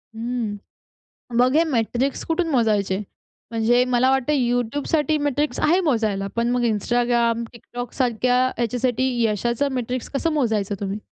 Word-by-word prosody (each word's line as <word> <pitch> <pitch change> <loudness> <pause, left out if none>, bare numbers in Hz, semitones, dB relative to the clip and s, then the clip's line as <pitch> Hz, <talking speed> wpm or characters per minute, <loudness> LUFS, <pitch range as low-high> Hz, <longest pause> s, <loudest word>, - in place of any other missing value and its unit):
हं. 230 -2 -3 0.8
मग 255 +3 +4
हे 325 - +5
मेट्रिक्स 255 -1 -1
कुठून 330 +1 0
मोजायचे? 210 -7 +1 0.5
म्हणजे 230 +2 +3
मला 250 +2 +4
वाटतं 270 +2 +1
YouTubeसाठी 280 +5 0
मेट्रिक्स 290 0 -1
आहे 345 +5 +3
मोजायला. 220 - 0
पण 235 0 +1
मग 245 0 +1
Instagram, 235 +1 +1
TikTokसारख्या 245 +1 -1
ह्याच्यासाठी 245 +2 0 0.2
यशाचं 235 +6 0
मेट्रिक्स 250 0 -3
कसं 325 +4 0
मोजायचं 220 -8 0
तुम्ही? 200 +1 -3
245 Hz, 125 wpm, -22 LUFS, 225-265 Hz, 0.8 s, हे